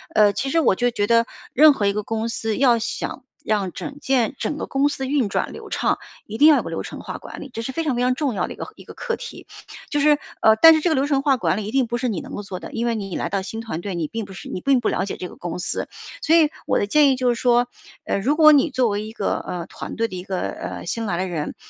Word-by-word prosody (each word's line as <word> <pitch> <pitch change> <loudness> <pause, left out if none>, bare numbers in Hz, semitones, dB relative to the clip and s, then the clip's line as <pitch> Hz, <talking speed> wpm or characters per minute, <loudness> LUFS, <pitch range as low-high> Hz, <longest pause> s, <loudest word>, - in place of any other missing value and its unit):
呃， 210 -1 +5
其 270 - -2
实 330 - +2
我 315 - +4
就 245 +6 +1
觉 205 -4 -1
得 230 +2 +3 0.3
任 305 +3 +8
何 210 - -1
一 200 - +2
个 210 - -1
公 225 +2 -3
司 225 -1 -2
要 245 -4 +4
想 240 +3 -4 0.2
让 205 -4 0
整 290 - -7
件 265 -3 +1
整 - - -2
个 - - -5
公 275 +1 +2
司 270 -2 -3
运 270 -4 +1
转 200 - -2
流 - - -9
畅， - - 0 0.3
一 215 - -6
定 295 - +7
要 305 -2 +7
有 - - +1
个 - - -7
流 - - -4
程 - - -8
化 - - -6
管 - - -10
理， 275 - -8
这 230 - -5
是 265 - -4
非 330 +5 -2
常 290 -5 0
非 240 - -1
常 250 0 +3
重 270 -3 -1
要 - - 0
的 - - -7
一 - - -13
个 - - -6
一 - - -13
个 - - -11
课 475 -1 -3
题。 - - -10 0.4
就 295 - 0
是 295 0 +4 0.2
呃， 220 - +7
但 325 0 +10
是 - - +2
这 345 - +1
个 - - +3
流 270 +2 +1
程 275 -2 +1
化 275 -3 +3
管 210 - 0
理 210 - -3
一 210 - -5
定 265 -1 +2
不 240 +1 -2
是 250 +1 -1
你 210 -8 -2
能 - - -8
够 205 - -5
做 190 -2 -6
的， - - -9
因 230 +1 -2
为 235 - +1
你 195 -5 -4
来 - - -2
到 195 -1 -1
新 220 +3 -6
团 220 -8 -5
队， 195 0 -4
你 165 -3 -2
并 225 +6 -5
不 195 - -11
是 190 - -9
你 185 - -5
并 270 +2 +3
不 240 - 0
了 185 - 0
解 200 - -5
这 180 - -5
个 - - -13
公 175 -2 -5
司， 180 - -3 0.3
所 325 - +4
以 310 -3 +5 0.2
我 - - +2
的 - - +1
建 290 +7 +4
议 265 - +3
就 255 -1 +1
是 - - -5
说， 245 0 +3 0.4
呃， - - 0
如 270 +9 +1
果 305 -1 +8
你 295 +2 +4
作 255 -4 +1
为 205 0 -2
一 215 - -7
个， 210 -3 -1
呃， 175 -2 -5
团 - - -8
队 230 +1 0
的 185 - -8
一 180 - -6
个， 190 -1 -3
呃， - - -5
新 225 +6 -3
来 175 -3 -1
的 185 +1 -1
人， 160 -4 -4
235 Hz, 335 characters per minute, -22 LUFS, 205-275 Hz, 0.4 s, 但